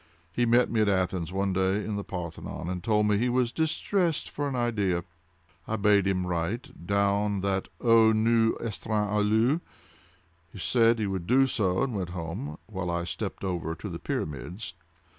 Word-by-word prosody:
He 120 Hz, +6 st, +1 dB
met 120 Hz, +2 st, +4 dB
me 115 Hz, -2 st, +2 dB
at 105 Hz, -, +3 dB
Athens, 90 Hz, -3 st, 0 dB
one 95 Hz, 0 st, 0 dB
day, 95 Hz, +2 st, +1 dB
in 105 Hz, -, -3 dB
the 100 Hz, -, -3 dB
Parthenon, 85 Hz, -2 st, -6 dB
and 90 Hz, -1 st, -4 dB
told 105 Hz, 0 st, +2 dB
me 105 Hz, -1 st, +2 dB
he 125 Hz, +2 st, +1 dB
was 125 Hz, -1 st, +1 dB
distressed 165 Hz, +2 st, 0 dB
for 145 Hz, 0 st, -2 dB
an 135 Hz, -, -3 dB
idea. 105 Hz, -8 st, 0 dB, 0.6 s
I 110 Hz, -, -1 dB
bade 100 Hz, -2 st, +3 dB
him 90 Hz, -2 st, 0 dB
write, 90 Hz, +5 st, -4 dB
down 100 Hz, 0 st, +1 dB
that 95 Hz, -1 st, -1 dB
δ -, -, -18 dB, 0.3 s
υοῦς 115 Hz, +1 st, +3 dB
εστιν 105 Hz, -1 st, -1 dB
αυλος. 110 Hz, +9 st, +2 dB, 0.9 s
He -, -, -11 dB
said 115 Hz, +4 st, +3 dB
that 110 Hz, -, -1 dB
he -, -, +1 dB
would 95 Hz, -3 st, -3 dB
do 135 Hz, +3 st, +5 dB
so, 100 Hz, -7 st, +1 dB
and 135 Hz, -3 st, -2 dB
went 95 Hz, -4 st, -3 dB
home, 80 Hz, -4 st, -5 dB
while 95 Hz, -4 st, -4 dB
I 85 Hz, 0 st, -1 dB
stepped 90 Hz, -, -5 dB
over 85 Hz, -3 st, -2 dB
to -, -, -7 dB
the -, -, -6 dB
pyramids. 75 Hz, -, -4 dB
100 Hz, 180 wpm, -28 LUFS, 90-115 Hz, 0.9 s, do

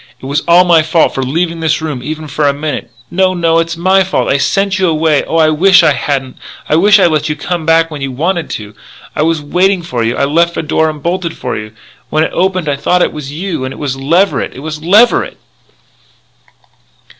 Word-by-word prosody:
It -, -, -11 dB
was 140 Hz, +3 st, -1 dB
all 175 Hz, +1 st, +6 dB
my 170 Hz, -3 st, +4 dB
fault 160 Hz, +1 st, +1 dB
for 135 Hz, -, -2 dB
leaving 165 Hz, +6 st, -2 dB
this 155 Hz, -2 st, 0 dB
room 150 Hz, -6 st, -4 dB
even 155 Hz, +3 st, -6 dB
for 145 Hz, 0 st, -1 dB
a 140 Hz, -, +2 dB
minute 150 Hz, -2 st, -4 dB
" -, -, -39 dB
"No, 185 Hz, +1 st, +1 dB
no, 170 Hz, -2 st, +1 dB
no! 165 Hz, -, +4 dB
It's 165 Hz, 0 st, -2 dB
my 190 Hz, +3 st, +3 dB
fault. 190 Hz, -, -1 dB
I 140 Hz, -, +2 dB
sent 195 Hz, +5 st, 0 dB
you 185 Hz, -, +2 dB
away. 155 Hz, -2 st, +1 dB
Oh, 165 Hz, -, -2 dB
I 160 Hz, -1 st, +4 dB
wish 185 Hz, +4 st, +4 dB
I 155 Hz, -, +4 dB
hadn't. 135 Hz, -2 st, -3 dB, 0.3 s
I -, -, +1 dB
wish 200 Hz, +5 st, +5 dB
I -, -, +3 dB
had 170 Hz, -, +3 dB
let 155 Hz, 0 st, 0 dB
you 150 Hz, -, -1 dB
come 165 Hz, +1 st, -4 dB
back 165 Hz, 0 st, +3 dB
when 150 Hz, -2 st, -7 dB
you 135 Hz, -1 st, -3 dB
wanted 165 Hz, +5 st, -2 dB
to.... 105 Hz, -1 st, -7 dB, 0.4 s
I -, -, -1 dB
was 160 Hz, -1 st, 0 dB
waiting 180 Hz, +4 st, +1 dB
for 125 Hz, -8 st, -3 dB
you.... 115 Hz, +1 st, -1 dB
I -, -, +1 dB
left 170 Hz, +4 st, +1 dB
the -, -, -2 dB
door 160 Hz, 0 st, +1 dB
unbolted 170 Hz, +3 st, -3 dB
for 125 Hz, -, -4 dB
you. 105 Hz, 0 st, -7 dB, 0.4 s
When 155 Hz, +1 st, +1 dB
it -, -, -2 dB
opened 185 Hz, -2 st, 0 dB
I 140 Hz, -1 st, -1 dB
thought 180 Hz, +5 st, +1 dB
it -, -, -1 dB
was 145 Hz, -2 st, -7 dB
you. 165 Hz, -2 st, -4 dB
And 130 Hz, -, -4 dB
it -, -, -9 dB
was 140 Hz, -3 st, -3 dB
Leverett! 165 Hz, +9 st, 0 dB
it 135 Hz, -, -9 dB
was 155 Hz, 0 st, -6 dB
Leverett! 210 Hz, +9 st, +3 dB
160 Hz, 235 wpm, -13 LUFS, 145-175 Hz, 0.4 s, all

